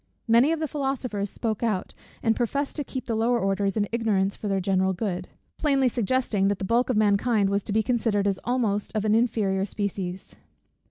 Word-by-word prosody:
Many 235 Hz, +6 st, +5 dB
of 330 Hz, -, 0 dB
the 315 Hz, -, -1 dB
philosophers 260 Hz, -8 st, -2 dB
spoke 220 Hz, 0 st, -3 dB
out, 215 Hz, -6 st, -1 dB, 0.3 s
and 225 Hz, -1 st, +3 dB
professed 280 Hz, +4 st, -1 dB
to 295 Hz, -, -1 dB
keep 260 Hz, -1 st, -6 dB
the 230 Hz, -, -2 dB
lower 230 Hz, +2 st, +2 dB
orders 195 Hz, 0 st, 0 dB
in 205 Hz, -1 st, +1 dB
ignorance 205 Hz, -4 st, +1 dB
for 210 Hz, -, -6 dB
the 195 Hz, -1 st, +1 dB
general 190 Hz, 0 st, +1 dB
good; 185 Hz, -2 st, -3 dB, 0.3 s
plainly 275 Hz, -4 st, +3 dB
suggesting 235 Hz, -4 st, +1 dB
that 200 Hz, 0 st, +1 dB
the 190 Hz, -, -4 dB
bulk 235 Hz, +5 st, +2 dB
of 250 Hz, -, +1 dB
mankind 205 Hz, 0 st, +2 dB
was 200 Hz, +1 st, +1 dB
to -, -, -4 dB
be 220 Hz, +1 st, +2 dB
considered 220 Hz, -4 st, +1 dB
as 195 Hz, -2 st, 0 dB
almost 225 Hz, -5 st, 0 dB
of 215 Hz, 0 st, 0 dB
an 215 Hz, -, +3 dB
inferior 215 Hz, -4 st, +1 dB
species. 195 Hz, -2 st, -4 dB
215 Hz, 200 wpm, -26 LUFS, 200-245 Hz, 0.3 s, Many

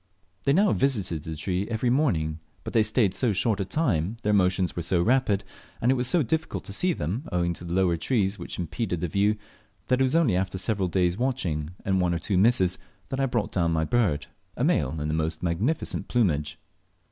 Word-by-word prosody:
They 140 Hz, -, +4 dB
now 195 Hz, +5 st, +4 dB
visited 105 Hz, -, 0 dB
the 80 Hz, -, -5 dB
tree 90 Hz, +5 st, -2 dB
every 120 Hz, +2 st, 0 dB
morning; 80 Hz, -, +1 dB, 0.2 s
but -, -, -6 dB
they 110 Hz, -, +5 dB
stayed 110 Hz, -2 st, +2 dB
so 120 Hz, -1 st, +1 dB
short 105 Hz, +2 st, +1 dB
a 100 Hz, -, -1 dB
time, 100 Hz, -, 0 dB
their 105 Hz, -, +2 dB
motions 90 Hz, -2 st, +2 dB
were 85 Hz, -, -2 dB
so 85 Hz, +1 st, +1 dB
rapid, 105 Hz, -1 st, +2 dB, 0.4 s
and 125 Hz, -, +3 dB
it -, -, +4 dB
was 125 Hz, -1 st, +1 dB
so 160 Hz, +4 st, +3 dB
difficult 160 Hz, +6 st, -2 dB
to 100 Hz, -, -6 dB
see 180 Hz, -, +2 dB
them, 110 Hz, -, -3 dB
owing 85 Hz, -1 st, 0 dB
to 85 Hz, -, -10 dB
the 85 Hz, 0 st, -3 dB
lower 90 Hz, -3 st, +2 dB
trees, 100 Hz, +3 st, 0 dB
which -, -, -6 dB
impeded 90 Hz, +1 st, -3 dB
the 90 Hz, -, 0 dB
view, 100 Hz, +5 st, +2 dB, 0.5 s
that 125 Hz, -, +3 dB
it -, -, +6 dB
was 130 Hz, +3 st, +1 dB
only 155 Hz, -, +3 dB
after 95 Hz, 0 st, -1 dB
several 95 Hz, -1 st, 0 dB
days' 90 Hz, +1 st, +1 dB
watching, 90 Hz, -, -2 dB
and 95 Hz, -1 st, +2 dB
one 85 Hz, -1 st, +1 dB
or -, -, 0 dB
two 95 Hz, +4 st, -2 dB
misses, 95 Hz, -4 st, +4 dB, 0.3 s
that 135 Hz, 0 st, -3 dB
I 135 Hz, -, +2 dB
brought 120 Hz, -4 st, -1 dB
down 85 Hz, -3 st, +1 dB
my 80 Hz, -1 st, +1 dB
bird 85 Hz, -7 st, +1 dB, 0.3 s
a -, -, -1 dB
male 75 Hz, +4 st, +1 dB
in 75 Hz, -, -2 dB
the 75 Hz, -, -1 dB
most 80 Hz, +1 st, -2 dB
magnificent 100 Hz, -, -1 dB
plumage. 80 Hz, -12 st, 0 dB
95 Hz, 215 wpm, -26 LUFS, 85-120 Hz, 0.5 s, it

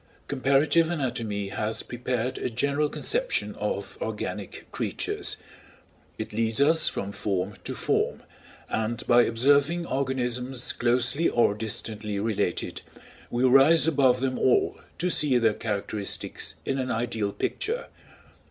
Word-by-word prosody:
Comparative 145 Hz, +5 st, +3 dB
anatomy 115 Hz, -, -2 dB
has 110 Hz, +2 st, -2 dB
prepared 125 Hz, 0 st, -2 dB
a -, -, -1 dB
general 140 Hz, +5 st, 0 dB
conception -, -, -1 dB
of -, -, -4 dB
organic -, -, -4 dB
creatures; 415 Hz, 0 st, -2 dB, 0.8 s
it -, -, -5 dB
leads 115 Hz, +1 st, +1 dB
us 160 Hz, +3 st, +5 dB
from 100 Hz, -, -4 dB
form 100 Hz, -1 st, -2 dB
to -, -, -4 dB
form, -, -, 0 dB, 0.4 s
and 110 Hz, +2 st, -2 dB
by 120 Hz, 0 st, +6 dB
observing 140 Hz, +9 st, +3 dB
organisms 130 Hz, -2 st, -1 dB
closely 125 Hz, +6 st, +2 dB
or 120 Hz, -4 st, +3 dB
distantly 105 Hz, -1 st, -4 dB
related, 105 Hz, -4 st, -1 dB, 0.5 s
we 120 Hz, +1 st, 0 dB
rise 135 Hz, +5 st, +6 dB
above 130 Hz, -5 st, +3 dB
them 130 Hz, -1 st, -1 dB
all 130 Hz, -, +2 dB, 0.2 s
to 180 Hz, -, 0 dB
see 145 Hz, -6 st, +2 dB
their 115 Hz, -3 st, +3 dB
characteristics 105 Hz, -1 st, -3 dB
in 135 Hz, 0 st, -1 dB
an 130 Hz, -1 st, -2 dB
ideal 115 Hz, -3 st, -1 dB
picture. 460 Hz, -, -2 dB
125 Hz, 125 wpm, -27 LUFS, 110-140 Hz, 0.8 s, by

